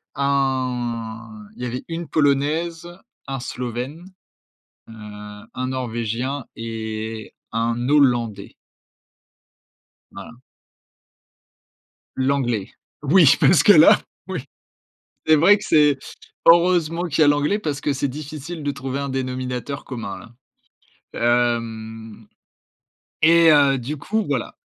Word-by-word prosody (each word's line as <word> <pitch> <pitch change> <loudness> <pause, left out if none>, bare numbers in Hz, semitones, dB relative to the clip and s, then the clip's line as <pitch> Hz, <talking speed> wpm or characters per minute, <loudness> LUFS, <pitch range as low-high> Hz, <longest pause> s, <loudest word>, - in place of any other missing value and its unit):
un 120 -5 -2
il - - -10
y - - -1
avait 125 +1 -4
une 165 0 -5
polonaise, 155 +3 0 0.4
un 135 0 -4
slovène, 125 +7 -5 0.8
heu, - - -12 0.6
un 130 - -3
norvégien 125 +1 -3
et 110 -1 -6 0.2
un 115 +2 -1
hollandais. 120 -8 +1 1.6
Voilà. - - -10 1.8
L'anglais. 130 -6 -1 0.3
Oui 155 0 +6
parce 175 - +5
que 205 - +7
là, 160 -3 +7 0.3
oui. - - -4 0.8
C'est 155 - +6
vrai 195 +7 +5
que 205 - -9
c'est, 150 -3 +4 0.5
heureusement 170 0 +4
qu'il 160 -2 +1
y - - +7
a - - +4
l'anglais, 145 +7 +2
parce 150 -8 -3
que 145 - 0
c'est 140 +1 -2
difficile 155 +3 -7
de 145 - -1
trouver 135 0 -5
un 140 0 -3
dénominateur 130 +1 -4
commun 115 -7 -6 0.8
là. 120 0 0
Hem 110 -1 -9 0.9
et 165 +1 +6
heu, 140 -2 +4
du 135 +5 -5
coup, 215 +9 -2
voilà. - - -3
135 Hz, 110 wpm, -21 LUFS, 120-150 Hz, 1.8 s, que